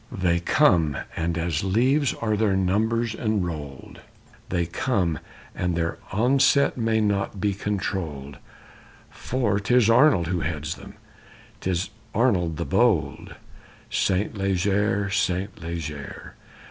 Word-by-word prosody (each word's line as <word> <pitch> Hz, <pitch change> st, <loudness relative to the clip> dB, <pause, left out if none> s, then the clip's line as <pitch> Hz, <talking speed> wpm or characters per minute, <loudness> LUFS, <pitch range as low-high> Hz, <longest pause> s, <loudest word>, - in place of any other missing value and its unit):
_They 90 Hz, -5 st, 0 dB
come, 80 Hz, -5 st, +3 dB, 0.2 s
and 85 Hz, 0 st, -1 dB
as 85 Hz, -1 st, -1 dB
leaves 130 Hz, +8 st, +2 dB
are 110 Hz, -2 st, -1 dB
their 105 Hz, -2 st, +1 dB
numbers 110 Hz, +5 st, +1 dB
enrolled! 85 Hz, -, -4 dB, 0.5 s
They 85 Hz, -2 st, 0 dB
come, 85 Hz, -, -1 dB, 0.3 s
and 90 Hz, -1 st, -1 dB
their 85 Hz, 0 st, -2 dB
onset 135 Hz, +6 st, +3 dB
may 115 Hz, -2 st, +1 dB
not 100 Hz, -1 st, 0 dB
be 100 Hz, +1 st, +1 dB
controlled, 85 Hz, -9 st, -4 dB, 0.7 s
For 115 Hz, -6 st, -1 dB
'tis 115 Hz, +2 st, +3 dB
Arnold 120 Hz, -, +5 dB
who 90 Hz, +2 st, -1 dB
heads 75 Hz, +1 st, -3 dB
them, -, -, -12 dB, 0.6 s
'tis 90 Hz, 0 st, -2 dB, 0.2 s
Arnold 90 Hz, -10 st, +2 dB
the -, -, -2 dB
bold_ -, -, +1 dB, 0.6 s
Saint 95 Hz, +3 st, 0 dB
Leger, 100 Hz, +1 st, 0 dB
Saint 95 Hz, 0 st, -1 dB
Leger! 80 Hz, -4 st, -6 dB
95 Hz, 115 wpm, -24 LUFS, 85-110 Hz, 0.7 s, Arnold